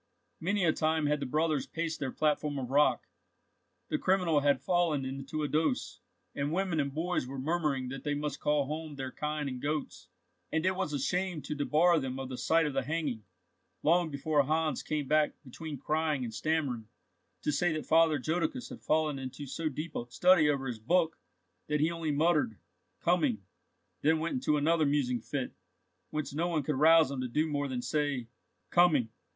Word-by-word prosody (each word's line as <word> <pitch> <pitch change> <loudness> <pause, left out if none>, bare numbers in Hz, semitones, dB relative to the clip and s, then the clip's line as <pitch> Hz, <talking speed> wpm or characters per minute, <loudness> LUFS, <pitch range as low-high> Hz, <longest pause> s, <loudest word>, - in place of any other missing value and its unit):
Many 195 +2 +1
a 160 - +4
time 160 0 +1
had 150 0 +1
the 140 - -3
brothers 155 0 0
paced 165 -1 -3
their 135 -3 -2
platform 150 -1 0
of 130 -2 -4
rock, 145 +2 +3 0.8
the 305 - 0
criminal 180 -5 +3
had 140 -2 +3
fallen 170 -7 +1
into 135 +3 -4
a - - 0
dose, 160 - 0 0.3
and 140 +1 -2
women 180 -2 0
and 140 -1 0
boys 160 -2 -1
were 135 +1 -6
murmuring 140 -3 -1
that 135 +1 -6
they 145 -1 -1
must 145 -1 -3
call 150 -1 +2
home 155 +1 -5
their 135 -2 -5
kine 150 0 -3
and 130 -2 -5
goats, 150 0 -3 0.4
and 160 +2 0
it 185 0 +2
was 165 - -2
a 145 - -1
shame 180 +3 -1
to - - -4
debar 155 +4 +3
them 130 -2 -4
of 135 -1 -5
the 130 - -5
sight 165 0 +3
of 145 - -2
the 135 - +1
hanging, 135 -6 -3 0.6
long 170 +2 +3
before 145 +1 +1
Hans 155 0 0
came 150 -3 -2
back 155 +1 +2
between 150 +3 -7
crying 155 0 0
and 115 -2 -5
stammering, 135 -6 -1 0.6
to - - +1
say 160 +4 +1
that 155 - -4
Father 160 -1 +4
Jodocus 175 - -2
had - - -9
fallen 155 -2 +1
into 130 +2 -6
so 155 +4 -2
deep 155 +2 -6
a 120 - -4
study 175 +2 +5
over 140 -2 0
his 120 -4 -4
book, 165 +7 +1 0.5
that 150 0 0
he 155 +3 +2
only 165 -2 -3
muttered 150 -7 +2 0.4
"Coming," 150 - +1 0.6
then 160 +2 +3
went 160 +2 -2
into 250 - +1
another 155 +1 +3
musing 130 -5 +1
fit, 135 +2 -4 0.6
whence 155 -3 -3
no 165 +4 0
one 160 -4 0
could 135 -1 -1
rouse 160 -2 +6
him 135 -2 -3
to 130 - -2
do 150 +6 +1
more 145 -2 -1
than 125 -2 -3
say 145 -2 -1 0.5
"Coming! 155 -10 +4
150 Hz, 190 wpm, -31 LUFS, 140-160 Hz, 0.8 s, rouse